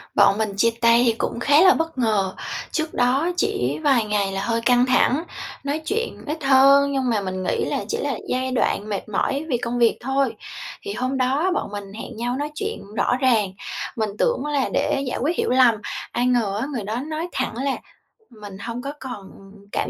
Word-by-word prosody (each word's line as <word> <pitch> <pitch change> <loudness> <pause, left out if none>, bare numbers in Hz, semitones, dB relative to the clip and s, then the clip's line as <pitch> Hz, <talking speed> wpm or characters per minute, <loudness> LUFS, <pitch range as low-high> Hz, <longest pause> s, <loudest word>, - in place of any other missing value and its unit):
Bọn 200 0 +5
mình 220 -1 0
chia 230 +3 +4
tay 235 +1 +5
thì 230 - +4
cũng 235 - -2
khá 290 +6 +5
là 375 0 +8
bất 325 -3 -2
ngờ. 210 -6 +1 0.4
Trước 315 -1 -2
đó 265 +7 +2
chỉ 415 0 0
vài 260 -6 +3
ngày 205 -2 0
là 195 0 -2
hơi 230 +1 0
căng 245 +1 +4
thẳng, 260 +4 +3 0.4
nói 290 +3 -2
chuyện 455 +3 -2
ít 305 0 -4
hơn 275 +1 +6
nhưng 265 -2 0
mà 215 -3 +1
mình 185 -1 -4
nghĩ - - 0
là - - -2
chỉ 455 - -2
là - - -2
giai 260 +1 -1
đoạn 215 -4 0
mệt 205 +1 -4
mỏi 275 +8 -1
vì 245 - +2
công 240 +1 -3
việc 230 -1 +4
thôi. 270 +1 0 0.5
Thì 405 - -5
hôm 255 +2 -2
đó 275 +8 +1
bọn 205 - -3
mình 200 -1 -7
hẹn 225 +1 -8
nhau 245 +2 -1
nói 295 +1 -3
chuyện 425 +5 -4
rõ 245 - +2
ràng, 225 -8 +2 0.4
mình 220 -2 -1
tưởng 485 -10 +1
là 290 -3 0
để 275 - +1
giải - - -2
quyết 320 +6 +1
hiểu - - 0
lầm, 250 -3 +5 0.4
ai 245 +1 0
ngờ 220 -5 +1
á, 270 - -2
người 230 -5 -3
đó 215 +3 -3
nói 315 +3 -4
thẳng - - -2
là 270 +1 0 0.5
"Mình 205 -4 -10
hông 235 +3 -5
có 280 +2 -5
còn 230 -7 -8 0.4
cảm - - -1
250 Hz, 210 wpm, -22 LUFS, 220-280 Hz, 0.5 s, là